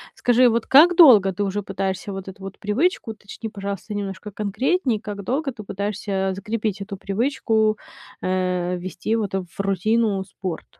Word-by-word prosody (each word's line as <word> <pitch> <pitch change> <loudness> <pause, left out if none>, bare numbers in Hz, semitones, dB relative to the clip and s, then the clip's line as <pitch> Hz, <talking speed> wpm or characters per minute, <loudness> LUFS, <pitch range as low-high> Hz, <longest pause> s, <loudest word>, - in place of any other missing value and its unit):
Скажи, 245 +1 +4
вот 230 -1 +1
как 330 +6 +7
долго 220 - +7
ты 205 - -2
уже 200 +1 -1
пытаешься 195 0 -3
вот 195 0 -6
эту 190 +1 -12
вот 195 0 -8
привычку, 235 - 0
уточни, 215 +1 -8
пожалуйста, 200 +1 -5
немножко 200 0 -5
конкретнее- 220 - 0
как 205 -1 -6
долго 270 +6 -1
ты 225 -4 -10
пытаешься, 195 -1 -2
закрепить 215 +1 -3
эту 200 0 -6
привычку, 220 +1 0 0.4
э, 180 -1 0
ввести, 185 +5 -2
вот, 205 -4 -2
в 185 -1 -5
рутину 200 +1 +1
спорт? 185 -3 -6
205 Hz, 155 wpm, -22 LUFS, 195-225 Hz, 0.4 s, как